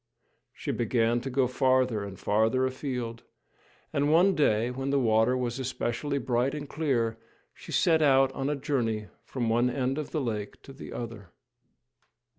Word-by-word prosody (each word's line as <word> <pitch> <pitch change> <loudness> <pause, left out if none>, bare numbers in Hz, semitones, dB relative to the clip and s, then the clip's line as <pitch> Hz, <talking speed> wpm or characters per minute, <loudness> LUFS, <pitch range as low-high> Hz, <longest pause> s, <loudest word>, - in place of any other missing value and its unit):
She - - -4
began 120 0 +1
to 135 - -4
go 130 0 +2
farther 130 -3 +2
and 100 -2 -8
farther 110 +5 +2
afield, 125 -3 -4 0.7
and 145 +1 +2
one 180 +5 +5
day, 120 -7 +2
when 135 +2 -3
the 140 - +2
water 115 0 +3
was 125 0 -2
especially 130 +2 -2
bright 125 +2 0
and 145 -1 -6
clear, 120 -8 -1 0.3
she - - -12
set 160 -2 +3
out 135 -2 +5
on 135 +1 -2
a 150 - 0
journey 120 -8 -1
from 125 -3 -3
one 120 +2 +2
end 130 +2 -1
of 150 - -5
the 155 - -2
lake 105 -5 -4
to 135 - -11
the 135 - -10
other. 115 -6 -7
125 Hz, 165 wpm, -28 LUFS, 115-140 Hz, 0.7 s, one